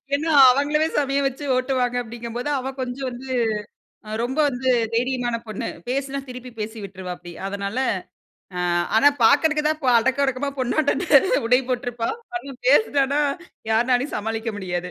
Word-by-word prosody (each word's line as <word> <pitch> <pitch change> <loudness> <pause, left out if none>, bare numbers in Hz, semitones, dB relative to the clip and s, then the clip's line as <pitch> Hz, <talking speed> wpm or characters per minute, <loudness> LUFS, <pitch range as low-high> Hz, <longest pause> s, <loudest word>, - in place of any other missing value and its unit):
ஏன்னா, 315 +3 -1 0.2
"அவங்களையே 295 +4 +1
செம்மையா 280 -1 +1
வச்சு 270 +2 -6
ஓட்டுவாங்க" 255 -1 0
அப்படீங்கும்போது, 240 +3 -5
அவ 265 +1 -4
கொஞ்சம் 255 +1 -4
வந்து 250 +2 -9 1.0
ரொம்ப 260 +5 -3
வந்து 260 -1 -2 0.3
தைரியமான 245 0 0
பொண்ணு. 215 -2 -5 0.2
பேசினா 275 +1 -2
திருப்பி 250 0 -8
பேசி 220 +1 -5
விட்டுருவா 190 -2 -7
அப்டி. 175 -1 -11
அதனால, 200 +2 -4 0.8
அ - - -2 0.4
ஆனா 275 +6 +7 0.2
பாக்கறதுக்கு 300 +4 +4
தான் 310 0 -1
பொ 255 - +2
அடக்கம் 265 +4 +1
ஒடுக்கமா 270 +1 -1
பொண்ணாட்டம் 255 +5 +1 0.4
உடை 250 +2 +5
போட்ருப்பா. 240 -2 -2 0.3
ஆனா 280 -6 -6 0.2
பேசினானா 285 -3 +3 0.5
யாருனாலயும் 245 +4 +2
சமாளிக்க 225 +2 -3
முடியாது. 180 -2 -4
250 Hz, 135 wpm, -23 LUFS, 230-275 Hz, 1.0 s, ஆனா